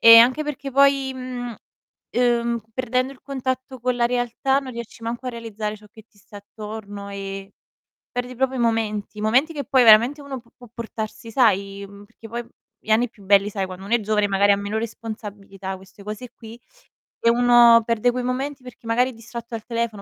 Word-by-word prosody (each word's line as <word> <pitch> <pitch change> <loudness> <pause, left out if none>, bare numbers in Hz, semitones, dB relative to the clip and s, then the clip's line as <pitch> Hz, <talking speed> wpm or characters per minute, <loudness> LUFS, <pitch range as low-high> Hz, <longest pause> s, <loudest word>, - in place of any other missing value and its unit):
E 230 0 +11
anche 255 +6 +5
perché 285 -2 -5
poi, 275 0 +4
mhmm, 250 -2 -5 0.6
ehm, 235 -1 +1
perdendo 255 +1 0
il 270 - -18
contatto 260 -1 -4
con 250 +1 0
la 235 -1 +3
realtà 245 +2 +1
non 265 -2 -6
riesci 235 -1 -8
manco 235 +3 -4
a - - -1
realizzare 220 -2 -5
ciò 210 0 -17
che 220 - -15
ti 205 - -28
sta 205 +1 -14
attorno, 205 0 -8
e 195 0 -6 0.6
perdi 245 0 -3
proprio 265 +1 0
i - - -2
momenti, 215 -2 -1
momenti 255 +9 +3
che 285 -2 -3
poi 260 -2 +4
veramente 235 +6 +7
uno 275 -2 -6
pu 235 0 -27
può 245 - -14
portarsi 225 -1 -6
sai, 200 -4 +2
mhmm, 200 0 -13
perché 225 +1 -14
poi 235 +1 -5 0.3
gli 220 - -10
anni 235 +3 +4
più 205 -3 -18
belli, 200 +1 +5
sai, 195 -2 -2
quando 185 +1 -9
uno 220 - +1
è 240 - +3
giovane 210 -1 +1
magari 200 +1 +4
ha 200 - +3
meno 200 +2 -3
responsabilità, 205 -4 -6
queste 190 +1 -16
cose 215 +4 -6
qui, 230 +1 -12 0.6
e 230 - +3
uno 240 -1 +7
perde 230 +1 +2
quei 250 +1 -2
momenti 265 +2 -3
perché 250 -1 -13
magari 245 +3 +2
è - - -13
distratto 235 +1 -8
al 220 - -6
telefono, 230 -3 -2
230 Hz, 200 wpm, -23 LUFS, 210-250 Hz, 0.6 s, E